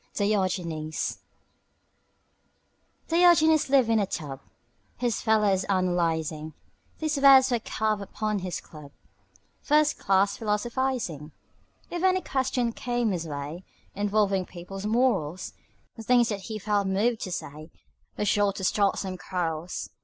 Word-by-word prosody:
DIOGENES 180 -6 -1 1.9
Diogenes 325 -3 +5
lived 265 -3 +4
in 225 -1 +3
a 200 - 0
tub 145 -7 -5 0.6
His 240 -3 -1
fellows 210 -4 +2
analyzing; 165 -5 -1 0.4
These 310 -1 -1
words 270 -2 +7
were 240 - +2
carved 215 -1 -1
upon 210 +1 -3
his 180 -1 -4
club: 150 -3 -13 0.7
"First 300 0 +2
Class 195 +1 +2
Philosophizing." 220 - -2 0.6
If 345 - -3
any 370 0 +3
question 260 -5 -1
came 240 -3 -1
his 170 -3 -3
way 150 +4 -6 0.3
Involving 200 -2 +1
people's 190 +3 -7
morals, 210 - 0 0.4
The 225 - -9
things 240 +1 +3
that 200 -3 -4
he 220 - -3
felt 205 -1 0
moved 220 +4 +1
to 185 - -4
say 155 -1 -6 0.5
Were 210 - -1
sure 205 -1 +2
to 190 - -7
start 200 +1 +2
some 185 -2 -4
quarrels. 170 -2 -4
205 Hz, 125 wpm, -26 LUFS, 180-240 Hz, 1.9 s, words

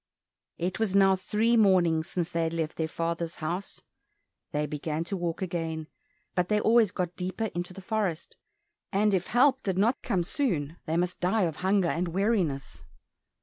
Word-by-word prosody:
It 180 +4 -2
was 210 -4 0
now 195 -1 +6
three 215 +5 +1
mornings 180 -6 +4
since 175 -3 -2
they 165 - -1
had 165 0 -1
left 165 -1 -2
their 160 - 0
father's 170 0 -3
house. 175 +5 -4 0.7
They 150 0 0
began 150 +2 -3
to 185 +4 -4
walk 175 0 -2
again, 165 -3 -3 0.4
but 180 -1 0
they 210 0 +3
always 225 -1 +4
got 180 -1 -3
deeper 185 +4 -3
into 175 +1 -3
the 195 +1 -10
forest, 195 -6 -2 0.6
and 205 +1 +2
if 185 -2 +1
help 265 +3 +4
did 190 -2 -2
not 230 +6 +2
come 180 -3 0
soon, 170 - -1
they 160 +1 0
must 180 +1 -1
die 190 +4 +2
of 165 -3 -1
hunger 190 0 +2
and 175 +2 -1
weariness. 175 - -1
180 Hz, 175 wpm, -28 LUFS, 165-200 Hz, 0.7 s, now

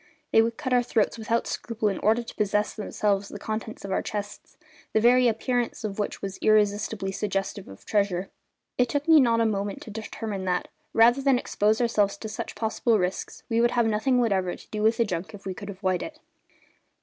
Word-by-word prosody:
They 225 - +6
would 230 0 -1
cut 260 -4 -2
our 245 - +5
throats 230 -1 0
without 230 +1 0
scruple 225 -2 -2
in 195 - -1
order 225 +3 +2
to - - -10
possess 210 0 0
themselves 205 -2 -1
of - - -10
the - - -6
contents 220 -1 -4
of 195 - -5
our - - +1
chests, 205 -1 -6 0.4
the - - +4
very 245 +2 +5
appearance 240 +1 -1
of 210 -1 -4
which 205 - -3
was 195 -1 -5
irresistibly 205 -1 +2
suggestive 195 0 -3
of 95 - -13
treasure. 195 -3 0 0.5
It 250 -1 +3
took 285 +4 -1
me 320 -1 +8
not 230 -3 +3
a - - +3
moment 200 -2 -1
to 220 - -9
determine 215 -2 -5
that, 180 -1 -1 0.2
rather 240 +4 +5
than 270 -2 +4
expose 215 -2 +1
ourselves 210 -5 +2
to 220 - -6
such 215 - -6
possible 225 0 +1
risks, 180 -1 -3
we 230 -1 +1
would 240 - +4
have 235 - +4
nothing 225 +4 +2
whatever 195 -6 +1
to - - -16
do 215 - -3
with 220 +1 +3
the 235 - +3
junk 185 +1 -4
if 200 - -14
we 190 - -3
could 200 +2 -9
avoid 185 -2 -1
it. 310 -1 -7
215 Hz, 210 wpm, -26 LUFS, 200-230 Hz, 0.5 s, me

